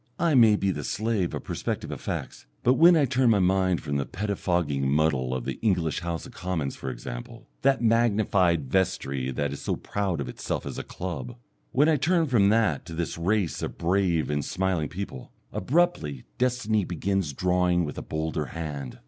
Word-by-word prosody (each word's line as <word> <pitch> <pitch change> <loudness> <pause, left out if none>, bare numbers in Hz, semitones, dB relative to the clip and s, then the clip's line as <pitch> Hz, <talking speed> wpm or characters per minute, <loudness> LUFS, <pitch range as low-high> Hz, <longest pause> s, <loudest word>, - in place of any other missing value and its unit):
I 170 -2 +2
may 115 -5 +7
be 100 -1 +1
the 75 -4 -4
slave 105 0 -1
of - - -5
perspective - - -3
effects, - - -5 0.2
but 125 - +5
when 170 +5 +7
I 145 - +4
turn 130 -1 +2
my 110 - +5
mind 95 -1 +2
from 70 -2 -1
the 70 - -1
pettifogging 90 -8 -1
muddle 70 -3 +2
of 65 -2 -3
the 65 - -4
English 90 -8 +1
House 85 -2 -4
of - - -11
Commons, 90 -6 -3
for 65 - -5
example, - - -8
that 135 -2 +3
magnified 100 - +3
vestry 70 -9 0
that 70 +1 -2
is 70 - -7
so - - -1
proud 95 -5 -2
of 70 - -3
itself 60 - -4
as - - -5
a - - -4
club 95 +7 -6 0.4
when 145 +4 +4
I 160 -2 +4
turn 165 +4 +2
from 115 -8 +4
that 105 -9 +2
to 85 - -7
this 85 0 -2
race 90 +1 0
of - - -4
brave 85 -3 +1
and 75 -1 0
smiling 90 -4 -1
people, 90 -9 -7 0.2
abruptly 120 - 0 0.2
destiny 120 -4 +1
begins 90 -1 -1
drawing 90 +2 +1
with 75 - -5
a - - -5
bolder 80 -1 -2
hand. 75 -6 -6
90 Hz, 185 wpm, -26 LUFS, 75-110 Hz, 0.4 s, may